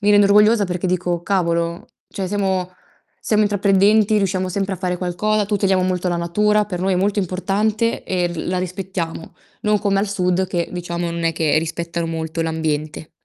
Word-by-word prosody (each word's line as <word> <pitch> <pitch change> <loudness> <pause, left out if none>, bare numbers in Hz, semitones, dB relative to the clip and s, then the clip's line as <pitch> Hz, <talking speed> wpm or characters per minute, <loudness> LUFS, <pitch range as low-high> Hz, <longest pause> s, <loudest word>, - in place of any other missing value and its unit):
mi 205 - +3
rende 205 0 +6
orgogliosa 210 +1 +5
perché 180 0 -2
dico: 175 -1 -1
"Cavolo, 170 -3 -1 0.2
cioè 190 -2 -4
siamo 190 -2 -1 0.5
siamo 215 -1 +2
intraprendenti, 205 +1 +3
riusciamo 190 -2 0
sempre 195 +1 -2
a - - -8
fare 180 0 -2
qualcosa, 205 +4 0
tuteliamo 195 -2 +1
molto 185 0 0
la 175 - 0
natura, 210 +5 +2
per 180 -4 -5
noi 190 0 +1
è - - +1
molto 200 +3 +1
importante 205 +5 -1
e 180 -2 0
l 170 -2 -5
la 185 - 0
rispettiamo"; 180 -2 -5 0.3
non 210 -2 +2
come 200 -2 +1
al 205 - -1
sud 185 -1 0
che, 175 -2 -2
diciamo, 175 -1 -3
non 170 0 -4
è 165 - +2
che 155 -1 +2
rispettano 170 +1 -3
molto 160 0 -4
l'ambiente. 155 -1 -3
185 Hz, 180 wpm, -20 LUFS, 170-200 Hz, 0.5 s, rende